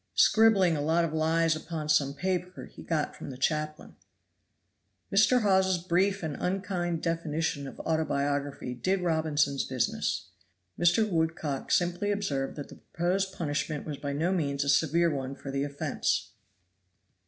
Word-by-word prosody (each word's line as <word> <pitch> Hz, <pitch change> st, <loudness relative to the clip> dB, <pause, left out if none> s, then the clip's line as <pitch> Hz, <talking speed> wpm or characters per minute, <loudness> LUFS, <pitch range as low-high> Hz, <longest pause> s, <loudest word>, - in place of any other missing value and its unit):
"Scribbling 205 Hz, -6 st, +5 dB
a 145 Hz, -, -2 dB
lot 165 Hz, +3 st, +2 dB
of 160 Hz, -, -4 dB
lies 160 Hz, +1 st, +2 dB
upon 155 Hz, -1 st, -5 dB
some 140 Hz, -2 st, +2 dB
paper 180 Hz, +1 st, -3 dB
he -, -, -13 dB
got 155 Hz, -3 st, -2 dB
from -, -, -8 dB
the 130 Hz, -, -8 dB
chaplain." 155 Hz, +3 st, -2 dB, 1.2 s
Mr. 220 Hz, +4 st, +5 dB
Hawes's 190 Hz, -2 st, +3 dB
brief 185 Hz, +3 st, +1 dB
and 155 Hz, -3 st, -3 dB
unkind 180 Hz, -3 st, -2 dB
definition 160 Hz, -3 st, -1 dB
of -, -, -10 dB
autobiography 145 Hz, -4 st, -1 dB
did 185 Hz, +11 st, 0 dB
Robinson's 155 Hz, -5 st, +1 dB
business. 130 Hz, -7 st, -2 dB, 0.5 s
Mr. 195 Hz, +6 st, +4 dB
Woodcock 160 Hz, -6 st, -1 dB
simply 175 Hz, +3 st, +1 dB
observed 140 Hz, -10 st, -2 dB
that 145 Hz, -, -7 dB
the -, -, -12 dB
proposed 190 Hz, +3 st, -1 dB
punishment 155 Hz, -3 st, -3 dB
was 150 Hz, -2 st, -5 dB
by 140 Hz, 0 st, -4 dB
no 160 Hz, +6 st, 0 dB
means 140 Hz, -5 st, 0 dB
a 140 Hz, -, -2 dB
severe 165 Hz, +3 st, +3 dB
one 135 Hz, -1 st, -4 dB
for 135 Hz, 0 st, -7 dB
the 135 Hz, 0 st, -1 dB
offense. 145 Hz, 0 st, -1 dB
160 Hz, 145 wpm, -29 LUFS, 145-180 Hz, 1.2 s, Scribbling